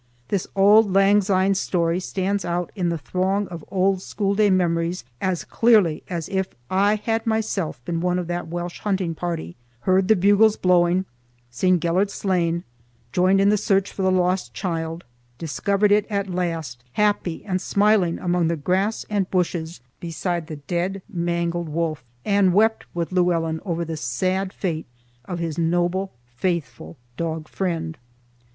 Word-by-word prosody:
This 195 Hz, -3 st, -1 dB
auld 205 Hz, +1 st, +6 dB
lang 195 Hz, +2 st, +5 dB
syne 190 Hz, 0 st, +2 dB
story 175 Hz, -2 st, 0 dB
stands 195 Hz, +2 st, -2 dB
out 175 Hz, 0 st, -2 dB
in 180 Hz, -4 st, 0 dB
the 170 Hz, -, -1 dB
throng 190 Hz, +5 st, -1 dB
of 170 Hz, -3 st, -8 dB
old 190 Hz, 0 st, +2 dB
schoolday 200 Hz, +2 st, +1 dB
memories 170 Hz, -2 st, +1 dB, 0.2 s
as 185 Hz, -2 st, -1 dB
clearly 210 Hz, -9 st, +3 dB
as 170 Hz, -4 st, -3 dB
if 190 Hz, -1 st, 0 dB, 0.2 s
I 200 Hz, +3 st, +3 dB
had 225 Hz, +2 st, -2 dB
myself 205 Hz, -, -1 dB
been 165 Hz, +2 st, -2 dB
one 180 Hz, 0 st, +1 dB
of 180 Hz, -, -2 dB
that 175 Hz, 0 st, -3 dB
Welsh 175 Hz, +1 st, -5 dB
hunting 190 Hz, -5 st, -1 dB
party—heard 160 Hz, -, -2 dB
the 220 Hz, -, +6 dB
bugles 205 Hz, +3 st, +4 dB
blowing, 180 Hz, 0 st, +3 dB, 0.5 s
seen 185 Hz, +9 st, +2 dB
Gelert 175 Hz, +5 st, +1 dB
slain, 175 Hz, -4 st, 0 dB, 0.5 s
joined 185 Hz, +4 st, +3 dB
in 200 Hz, +1 st, +4 dB
the 210 Hz, -, +3 dB
search 195 Hz, 0 st, +1 dB
for -, -, -5 dB
the 190 Hz, -, +3 dB
lost 180 Hz, -, 0 dB
child, 165 Hz, -, -3 dB, 0.3 s
discovered 200 Hz, +5 st, 0 dB
it 210 Hz, 0 st, +3 dB
at 200 Hz, -2 st, -1 dB
last 165 Hz, -9 st, -3 dB
happy 205 Hz, -5 st, 0 dB
and 185 Hz, -3 st, -1 dB
smiling 200 Hz, -4 st, +2 dB
among 175 Hz, -2 st, +1 dB
the 170 Hz, 0 st, 0 dB
grass 190 Hz, +8 st, 0 dB
and 200 Hz, -3 st, -1 dB
bushes 170 Hz, -4 st, -1 dB, 0.2 s
beside 170 Hz, 0 st, -3 dB
the 160 Hz, -, -6 dB
dead, 175 Hz, +6 st, -3 dB
mangled 170 Hz, -3 st, -2 dB
wolf, 155 Hz, -2 st, -2 dB, 0.2 s
and 200 Hz, -3 st, +3 dB
wept 220 Hz, +2 st, +3 dB
with 170 Hz, 0 st, -2 dB
Llewellyn 165 Hz, -3 st, +1 dB
over 170 Hz, -2 st, -2 dB
the 160 Hz, -1 st, -4 dB
sad 185 Hz, +9 st, -1 dB
fate 165 Hz, -6 st, -3 dB, 0.4 s
of 180 Hz, -, -4 dB
his 165 Hz, -2 st, -3 dB
noble, 175 Hz, +3 st, 0 dB
faithful 120 Hz, -, -4 dB, 0.2 s
dog 160 Hz, -2 st, -3 dB
friend. 165 Hz, -4 st, -3 dB
180 Hz, 155 wpm, -23 LUFS, 165-195 Hz, 0.5 s, auld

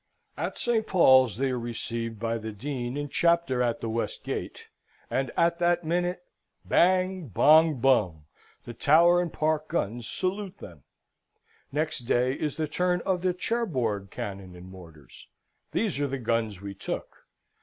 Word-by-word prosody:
At -, -, -4 dB
St. 225 Hz, -2 st, 0 dB
Paul's 130 Hz, -, +5 dB
they 135 Hz, +1 st, 0 dB
are 125 Hz, -, -2 dB
received 115 Hz, -1 st, -4 dB
by 115 Hz, 0 st, -2 dB
the 110 Hz, 0 st, -6 dB
Dean 125 Hz, +3 st, -4 dB
and 145 Hz, -1 st, -4 dB
Chapter 170 Hz, -7 st, +2 dB
at 120 Hz, -2 st, 0 dB
the -, -, -3 dB
West 115 Hz, +1 st, -3 dB
Gate, -, -, -5 dB, 0.5 s
and 135 Hz, -2 st, 0 dB
at 170 Hz, 0 st, +2 dB
that 175 Hz, 0 st, +2 dB
minute 175 Hz, +2 st, -1 dB, 0.4 s
bang, 185 Hz, -1 st, +2 dB
bong, 155 Hz, -, +5 dB
bung 100 Hz, -, +2 dB, 0.4 s
the 120 Hz, -, -7 dB
Tower 170 Hz, +8 st, +5 dB
and 175 Hz, -3 st, -3 dB
Park 155 Hz, 0 st, 0 dB
guns 120 Hz, -7 st, -3 dB
salute 190 Hz, +1 st, -3 dB
them! 85 Hz, -5 st, -12 dB, 0.9 s
Next 155 Hz, +1 st, -1 dB
day 125 Hz, +1 st, +2 dB
is 150 Hz, +1 st, -3 dB
the 155 Hz, -1 st, -2 dB
turn 180 Hz, +3 st, 0 dB
of 185 Hz, -1 st, -1 dB
the 180 Hz, -1 st, 0 dB
Cherbourg 130 Hz, -, -1 dB
cannon 95 Hz, -2 st, -7 dB
and 90 Hz, +1 st, -12 dB
mortars. 80 Hz, -6 st, -14 dB, 0.4 s
These 205 Hz, -10 st, -1 dB
are 145 Hz, -, +1 dB
the 135 Hz, 0 st, -3 dB
guns 115 Hz, -5 st, -1 dB
we 100 Hz, 0 st, -6 dB
took. 95 Hz, -, -7 dB
135 Hz, 155 wpm, -27 LUFS, 115-170 Hz, 0.9 s, Paul's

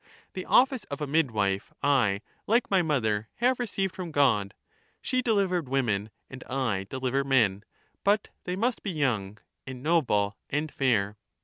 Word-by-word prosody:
The 185 Hz, -, -5 dB
office 260 Hz, -2 st, +4 dB
of 140 Hz, -, -6 dB
a 150 Hz, -, -2 dB
midwife 110 Hz, -10 st, 0 dB
I, 120 Hz, -9 st, +3 dB, 0.3 s
like 230 Hz, +1 st, +2 dB
my 190 Hz, -2 st, +5 dB
mother, 110 Hz, -9 st, 0 dB
have 250 Hz, +2 st, +1 dB
received 195 Hz, -5 st, -1 dB
from 180 Hz, -2 st, -6 dB
God; 120 Hz, -10 st, +2 dB, 0.4 s
she 255 Hz, 0 st, 0 dB
delivered 195 Hz, -, +1 dB
women, 110 Hz, -6 st, 0 dB, 0.2 s
and 130 Hz, 0 st, -10 dB
I 120 Hz, -8 st, -1 dB
deliver 130 Hz, +1 st, -1 dB
men; 115 Hz, -8 st, +2 dB, 0.4 s
but 205 Hz, +1 st, +2 dB, 0.2 s
they 180 Hz, -, -2 dB
must 230 Hz, +5 st, 0 dB
be 200 Hz, -, -4 dB
young 115 Hz, -, -1 dB, 0.3 s
and 130 Hz, -1 st, -7 dB
noble 120 Hz, -11 st, +2 dB
and 150 Hz, +1 st, -1 dB
fair. 105 Hz, -6 st, +1 dB
135 Hz, 150 wpm, -28 LUFS, -, 0.4 s, my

